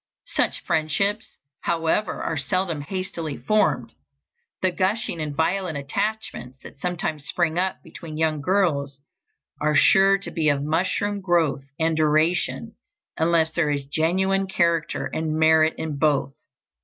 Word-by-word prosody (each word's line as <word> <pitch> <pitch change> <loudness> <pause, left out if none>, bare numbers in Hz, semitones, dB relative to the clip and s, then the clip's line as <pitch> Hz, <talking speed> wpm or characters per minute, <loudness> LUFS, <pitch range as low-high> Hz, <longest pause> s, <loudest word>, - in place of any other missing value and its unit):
Such - - +1
friendships, 200 +8 0 0.2
however, 165 +5 0
are - - -2
seldom 160 +3 -1
hastily 170 -2 -4
formed. 215 0 +1 0.7
The 185 - +3
gushing 185 -2 -1
and 150 -2 -4
violent 175 0 0
attachments 140 - -3
that - - -12
sometimes 160 -4 -3
spring 170 -1 0
up 190 +1 -1
between 155 -3 -9
young 155 -2 0
girls 145 -6 +1 0.6
are 150 0 +2
sure 195 +6 +5
to 195 - -8
be 160 -3 +1
of 140 -1 +1
mushroom 190 +6 0
growth 165 -7 +1
and 160 0 +1
duration, 160 +8 +1 0.4
unless 160 0 +2
there 160 -2 +1
is 140 -1 -1
genuine 190 +6 +1
character 170 -6 0
and 155 +3 -2
merit 160 0 +4
in 150 -3 -4
both. 140 -3 +1
160 Hz, 130 wpm, -24 LUFS, 155-185 Hz, 0.7 s, sure